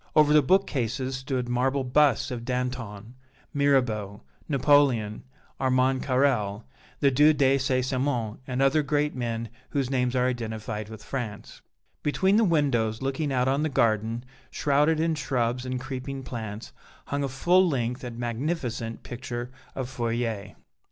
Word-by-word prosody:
Over 150 Hz, -1 st, +6 dB
the 150 Hz, -, +7 dB
bookcases 130 Hz, -, +1 dB
stood 130 Hz, -2 st, -2 dB
marble 130 Hz, +3 st, +1 dB
busts 135 Hz, 0 st, +3 dB
of 120 Hz, -2 st, -4 dB
Danton, 125 Hz, -4 st, -4 dB, 0.4 s
Mirabeau, 125 Hz, -, +1 dB, 0.3 s
Napoleon, 135 Hz, -7 st, +3 dB, 0.4 s
Armand 130 Hz, 0 st, +2 dB
Carrel, 125 Hz, -6 st, +1 dB, 0.4 s
the 140 Hz, -2 st, +5 dB
Duc 150 Hz, +3 st, +5 dB
de 135 Hz, -1 st, +4 dB
St. 130 Hz, -1 st, +1 dB
Simon 125 Hz, -5 st, -1 dB
and 130 Hz, +1 st, 0 dB
other 135 Hz, +3 st, +4 dB
great 150 Hz, 0 st, 0 dB
men 115 Hz, -2 st, -3 dB, 0.2 s
whose 135 Hz, -2 st, -1 dB
names 125 Hz, -1 st, +1 dB
are 125 Hz, 0 st, +3 dB
identified 110 Hz, -3 st, -4 dB
with 110 Hz, -1 st, -10 dB
France; 115 Hz, -6 st, -6 dB, 0.4 s
between 190 Hz, +7 st, +2 dB
the 225 Hz, -, +5 dB
windows 135 Hz, -, +1 dB
looking 135 Hz, +2 st, -1 dB
out 125 Hz, -1 st, +1 dB
on 135 Hz, +2 st, +2 dB
the 155 Hz, -, 0 dB
garden, 115 Hz, -1 st, +1 dB, 0.2 s
shrouded 150 Hz, +2 st, +2 dB
in 165 Hz, 0 st, +2 dB
shrubs 125 Hz, -4 st, -1 dB
and 130 Hz, 0 st, -2 dB
creeping 130 Hz, +1 st, -5 dB
plants, 110 Hz, -4 st, -6 dB, 0.3 s
hung 140 Hz, 0 st, -2 dB
a -, -, 0 dB
full 175 Hz, +8 st, +3 dB
length 125 Hz, -3 st, -2 dB
and 120 Hz, -2 st, -6 dB
magnificent 120 Hz, -1 st, -3 dB
picture 120 Hz, 0 st, -6 dB, 0.2 s
of 130 Hz, -2 st, -3 dB
Fourier. 115 Hz, -4 st, -3 dB
130 Hz, 145 wpm, -26 LUFS, 115-140 Hz, 0.4 s, the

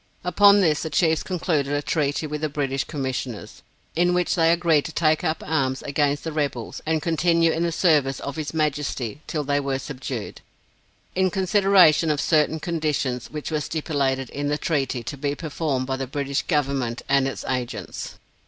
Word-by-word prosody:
Upon 200 Hz, +3 st, +6 dB
this 155 Hz, -5 st, +2 dB
the 160 Hz, -, -3 dB
Chiefs 160 Hz, +1 st, +2 dB
concluded 160 Hz, -6 st, -1 dB
a 145 Hz, 0 st, 0 dB
treaty 145 Hz, 0 st, 0 dB
with 150 Hz, 0 st, -4 dB
the 155 Hz, -, 0 dB
British 140 Hz, -2 st, -1 dB
Commissioners, 130 Hz, -5 st, -5 dB, 0.3 s
in 175 Hz, +2 st, +3 dB
which 180 Hz, 0 st, +1 dB
they 165 Hz, -3 st, +4 dB
agreed 170 Hz, -4 st, +3 dB
to -, -, -5 dB
take 155 Hz, -1 st, +2 dB
up 155 Hz, 0 st, -1 dB
arms 135 Hz, -4 st, 0 dB
against 145 Hz, 0 st, 0 dB
the 160 Hz, -, -3 dB
rebels, 140 Hz, -6 st, -3 dB
and 160 Hz, -1 st, 0 dB
continue 165 Hz, 0 st, +3 dB
in 160 Hz, -, -1 dB
the 170 Hz, 0 st, +1 dB
service 150 Hz, -6 st, +2 dB
of 140 Hz, -, -5 dB
his 150 Hz, -3 st, -4 dB
Majesty 145 Hz, -5 st, -2 dB
till 150 Hz, -2 st, -2 dB
they 145 Hz, 0 st, +1 dB
were 135 Hz, -1 st, -1 dB
subdued, 130 Hz, -5 st, -6 dB, 0.7 s
in 185 Hz, 0 st, +2 dB
consideration 190 Hz, -4 st, +4 dB
of 150 Hz, -1 st, +1 dB
certain 155 Hz, +1 st, +2 dB
conditions 150 Hz, -7 st, -2 dB
which 150 Hz, +1 st, -6 dB
were 155 Hz, -1 st, 0 dB
stipulated 140 Hz, -5 st, -1 dB
in 145 Hz, 0 st, -3 dB
the 145 Hz, +1 st, 0 dB
treaty 135 Hz, -7 st, -1 dB
to 115 Hz, +6 st, -6 dB
be 140 Hz, +1 st, -2 dB
performed 145 Hz, -4 st, -2 dB
by 130 Hz, 0 st, -2 dB
the 135 Hz, 0 st, -4 dB
British 140 Hz, +1 st, -2 dB
government 135 Hz, -6 st, -1 dB
and 140 Hz, -1 st, +3 dB
its 135 Hz, -, -5 dB
agents. 125 Hz, -2 st, -4 dB
150 Hz, 180 wpm, -24 LUFS, 135-160 Hz, 0.7 s, Upon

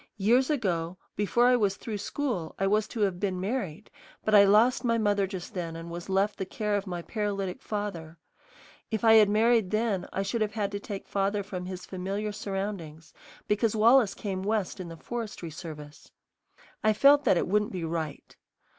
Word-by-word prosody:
Years 240 Hz, +7 st, +3 dB
ago, 185 Hz, -, -1 dB, 0.2 s
before 210 Hz, +4 st, +2 dB
I 250 Hz, 0 st, +6 dB
was 205 Hz, -5 st, +1 dB
through 215 Hz, -3 st, -5 dB
school, 205 Hz, -, -3 dB
I 195 Hz, -, 0 dB
was 210 Hz, +2 st, +2 dB
to 230 Hz, -, -5 dB
have 190 Hz, -3 st, +1 dB
been 190 Hz, -2 st, -1 dB
married; 200 Hz, -3 st, -4 dB, 0.3 s
but 215 Hz, -, +1 dB
I 200 Hz, -1 st, +8 dB
lost 220 Hz, +7 st, +4 dB
my 230 Hz, -1 st, +2 dB
mother 205 Hz, -3 st, +1 dB
just 185 Hz, -2 st, -7 dB
then 170 Hz, -3 st, -4 dB
and 165 Hz, +1 st, -7 dB
was 175 Hz, +2 st, -7 dB
left 195 Hz, +2 st, +1 dB
the -, -, 0 dB
care 210 Hz, +1 st, -2 dB
of 200 Hz, 0 st, -2 dB
my 175 Hz, -2 st, -4 dB
paralytic 200 Hz, -3 st, -3 dB
father. 180 Hz, -6 st, -5 dB, 0.7 s
If 220 Hz, -1 st, -2 dB
I 225 Hz, -1 st, +7 dB
had 215 Hz, -2 st, +7 dB
married 220 Hz, -1 st, +3 dB
then, 215 Hz, -3 st, 0 dB
I 195 Hz, -, -1 dB
should 220 Hz, +4 st, -2 dB
have 215 Hz, -1 st, 0 dB
had 205 Hz, -3 st, -1 dB
to 200 Hz, -, -3 dB
take 200 Hz, -1 st, -7 dB
father 200 Hz, +1 st, 0 dB
from 185 Hz, -2 st, -6 dB
his 185 Hz, -1 st, -6 dB
familiar 195 Hz, +3 st, -3 dB
surroundings, 195 Hz, -7 st, -5 dB, 0.3 s
because 210 Hz, +1 st, +1 dB
Wallace 225 Hz, -1 st, +5 dB
came 190 Hz, -3 st, -4 dB
West 205 Hz, -1 st, -1 dB
in 185 Hz, -, -5 dB
the 165 Hz, -, -9 dB
forestry 215 Hz, -6 st, -6 dB
service. 150 Hz, -2 st, -10 dB, 0.7 s
I 215 Hz, 0 st, +4 dB
felt 280 Hz, +6 st, +6 dB
that -, -, +4 dB
it -, -, 0 dB
wouldn't 210 Hz, +2 st, +1 dB
be 180 Hz, -3 st, -4 dB
right. 160 Hz, -2 st, -4 dB
200 Hz, 190 wpm, -28 LUFS, 180-215 Hz, 0.7 s, I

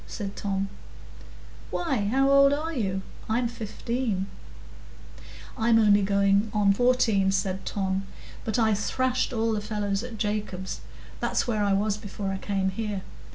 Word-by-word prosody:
said 200 Hz, -2 st, -5 dB
Tom. 195 Hz, -1 st, -1 dB, 1.0 s
"Why, 270 Hz, -12 st, -1 dB
how 270 Hz, +5 st, +3 dB
old 275 Hz, 0 st, +6 dB
are 315 Hz, +3 st, -2 dB
you? 195 Hz, -7 st, -1 dB, 0.3 s
I'm 240 Hz, +2 st, +2 dB
fifteen." 230 Hz, -2 st, -2 dB, 1.3 s
"I'm 230 Hz, -1 st, +3 dB
only 205 Hz, -2 st, +5 dB
going 200 Hz, +1 st, +3 dB
in 200 Hz, -1 st, +4 dB
fourteen," 225 Hz, -4 st, +3 dB
said 190 Hz, 0 st, -1 dB
Tom. 195 Hz, -1 st, -1 dB, 0.4 s
"But 220 Hz, -, -1 dB
I 220 Hz, -2 st, +3 dB
thrashed 255 Hz, +5 st, 0 dB
all 225 Hz, -2 st, 0 dB
the 215 Hz, -1 st, -1 dB
fellows 205 Hz, -2 st, -1 dB
at 245 Hz, -2 st, -7 dB
Jacob's—that's 205 Hz, -3 st, -3 dB
where 215 Hz, -4 st, 0 dB
I 200 Hz, -1 st, +2 dB
was 205 Hz, +1 st, +1 dB
before 205 Hz, -2 st, -5 dB
I 195 Hz, -, -3 dB
came 195 Hz, -2 st, 0 dB
here. 205 Hz, -1 st, -3 dB
210 Hz, 140 wpm, -27 LUFS, 195-235 Hz, 1.3 s, old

